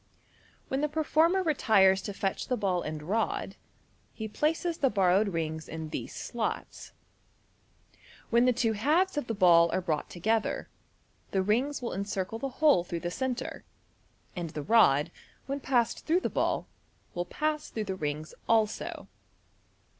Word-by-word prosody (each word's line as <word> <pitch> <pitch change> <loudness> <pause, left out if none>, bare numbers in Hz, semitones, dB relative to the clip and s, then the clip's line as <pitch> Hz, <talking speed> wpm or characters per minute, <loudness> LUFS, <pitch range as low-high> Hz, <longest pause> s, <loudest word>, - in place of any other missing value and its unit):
When 265 +1 -1
the 300 - +1
performer 320 +4 +2
retires 200 - +4
to 205 - -5
fetch 195 -1 -2
the 250 - 0
ball 185 -4 0
and 155 -1 -5
rod, 210 +8 -1 0.6
he 220 - -4
places 325 +8 -1
the 270 - +3
borrowed 195 0 +3
rings 160 -3 -3
in 160 -1 -6
these - - -5
slots. 235 -2 -4 1.4
When 235 +1 +5
the 250 - +5
two 225 -2 +1
halves 310 - +2
of 295 -4 -2
the 225 - -2
ball 170 -3 +6
are - - +1
brought 160 -5 -2
together, 220 +5 -1 0.6
the 190 -1 0
rings 250 +8 0
will 235 - -3
encircle 200 +2 -3
the 275 - -3
hole 290 - +3
through 170 -1 -5
the 175 - -3
centre, 260 +3 -3 0.7
and 175 -3 -4
the 150 -1 -5
rod, 150 -9 +4 0.3
when 275 +2 -3
passed 250 -4 0
through 340 +4 +3
the - - -2
ball, - - 0 0.5
will 175 0 -2
pass 300 +9 -2
through 220 - -3
the 190 - -2
rings 150 -2 -4 0.2
also. 220 -2 0
215 Hz, 155 wpm, -29 LUFS, 175-270 Hz, 1.4 s, ball